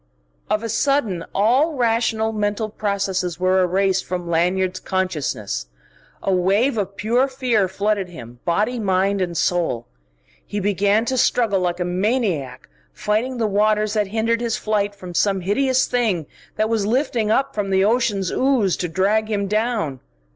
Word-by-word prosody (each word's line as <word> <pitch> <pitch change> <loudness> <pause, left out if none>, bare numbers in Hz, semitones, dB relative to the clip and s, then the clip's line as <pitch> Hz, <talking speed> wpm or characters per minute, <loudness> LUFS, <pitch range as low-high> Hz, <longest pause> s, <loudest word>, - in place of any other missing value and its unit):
Of 215 +1 0
a - - -2
sudden 225 -8 +1
all 255 +11 +3
rational 225 -2 +1
mental 210 0 -1
processes 195 -4 -2
were 185 +1 +3
erased 190 +1 +1
from 180 -1 -4
Lanyard's 180 +2 +1
consciousness. 150 - -2 0.6
A 195 - +1
wave 200 +9 +2
of 200 -2 -3
pure 240 +6 +2
fear 250 -7 +1
flooded 200 0 -1
him, 120 -7 -11
body, 210 +8 0
mind, 195 -1 +1
and 175 -2 -2
soul. 165 -11 0 0.6
He 205 - -4
began 205 +2 +2
to 260 +1 0
struggle 220 -6 +2
like 175 -1 -1
a 180 - 0
maniac, 185 - -1 0.2
fighting 215 +5 -1
the 230 - 0
waters 210 +1 +2
that 210 -2 +1
hindered 225 +3 0
his 235 -2 -1
flight 205 -1 -1
from 185 -3 -9
some 195 +1 +1
hideous 260 +7 +2
thing 220 -10 0 0.3
that 215 - +1
was 220 -3 0
lifting 240 -2 0
up 270 +5 +1
from 205 -2 -2
the 190 0 +3
ocean's 210 -5 +1
ooze 255 -9 +2
to 175 - -2
drag 205 +5 +1
him 205 -2 0
down. 210 - -1
205 Hz, 155 wpm, -21 LUFS, 185-225 Hz, 0.6 s, all